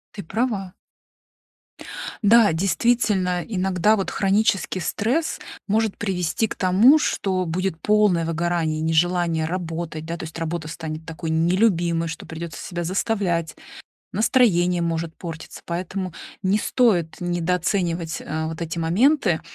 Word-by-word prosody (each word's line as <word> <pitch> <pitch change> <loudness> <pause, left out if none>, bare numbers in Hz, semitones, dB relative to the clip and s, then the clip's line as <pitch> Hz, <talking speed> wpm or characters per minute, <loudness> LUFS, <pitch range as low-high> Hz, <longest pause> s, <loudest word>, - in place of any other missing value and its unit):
Ты 200 - -6
права. 205 -2 -2 1.5
Да, 215 -3 +6
действительно, 185 0 +1
иногда 190 0 +2
вот 195 -3 -2
хронический 195 -1 +1
стресс 240 - -1 0.3
может 220 0 +1
привести 190 +1 -1
к - - -6
тому, 200 +11 +5
что 185 -9 0
будет 175 0 -2
полное 210 -5 +3
выгорание, 165 -1 -1
нежелание 165 0 +1
работать, 165 -2 -4
да, 170 +1 -4
то - - -7
есть 160 +1 -8
работа 165 -1 -3
станет 160 -1 -6
такой 165 0 -5
нелюбимой, 170 0 +2
что 165 - -7
придётся 160 0 -7
себя 175 -2 -4
заставлять, 180 -3 -1 0.6
настроение 180 -6 +3
может 165 -1 -2
портиться, 165 -2 -8
поэтому 185 +1 -4 0.3
не 190 +2 +2
стоит 205 -9 +2
недооценивать, 175 -1 -1
э, 160 +1 -3
вот 160 +1 -6
эти 165 +1 -4
моменты, 185 - +2
175 Hz, 125 wpm, -23 LUFS, 165-200 Hz, 1.5 s, Да